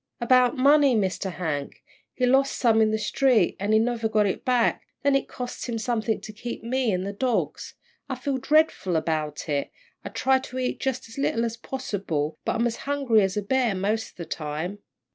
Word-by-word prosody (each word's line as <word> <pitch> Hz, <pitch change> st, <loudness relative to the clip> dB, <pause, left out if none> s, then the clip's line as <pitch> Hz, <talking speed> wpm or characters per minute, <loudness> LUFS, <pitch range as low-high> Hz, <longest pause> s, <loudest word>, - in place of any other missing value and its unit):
"About 250 Hz, +2 st, +4 dB
money, 280 Hz, 0 st, +5 dB
Mr. 190 Hz, -2 st, -1 dB
Hank. 150 Hz, -6 st, -4 dB, 0.3 s
He 255 Hz, -, +1 dB
lost 270 Hz, +2 st, +3 dB
some 225 Hz, -3 st, +4 dB
in 220 Hz, -, +4 dB
the 220 Hz, -, +1 dB
street, 225 Hz, -1 st, +2 dB
and 200 Hz, +2 st, -2 dB, 0.2 s
never 235 Hz, -2 st, -1 dB
got 215 Hz, -1 st, +3 dB
it 195 Hz, -, -2 dB
back 245 Hz, -2 st, +2 dB, 0.2 s
then 280 Hz, 0 st, +3 dB
it 275 Hz, -, +1 dB
costs 250 Hz, 0 st, -6 dB
something 220 Hz, -2 st, 0 dB
to 215 Hz, -, -9 dB
keep 235 Hz, +2 st, -6 dB
me 250 Hz, 0 st, 0 dB
and 185 Hz, 0 st, -1 dB
the 200 Hz, -, -4 dB
dogs. 245 Hz, +3 st, -2 dB, 0.3 s
I 265 Hz, -, -2 dB
feel 265 Hz, +1 st, -2 dB
dreadful 295 Hz, -, +2 dB
about 155 Hz, -2 st, -2 dB
it. 145 Hz, -2 st, -1 dB, 0.3 s
I -, -, -5 dB
try 260 Hz, +5 st, +2 dB
to 260 Hz, -1 st, -8 dB
eat 255 Hz, -1 st, -2 dB
jus' 265 Hz, -3 st, -2 dB
as 225 Hz, -, -13 dB
little 235 Hz, -4 st, +1 dB
as 230 Hz, -1 st, -3 dB
possible, 190 Hz, -, -3 dB
but -, -, 0 dB
I'm 235 Hz, -, +1 dB
as 235 Hz, -1 st, -1 dB
hungry 275 Hz, -6 st, +3 dB
as 190 Hz, 0 st, 0 dB
a 210 Hz, -, -1 dB
bear 245 Hz, -1 st, +1 dB
mos' 210 Hz, +4 st, -1 dB
all -, -, -23 dB
the 170 Hz, -, -6 dB
time." 155 Hz, +5 st, -4 dB
230 Hz, 200 wpm, -25 LUFS, 195-255 Hz, 0.3 s, money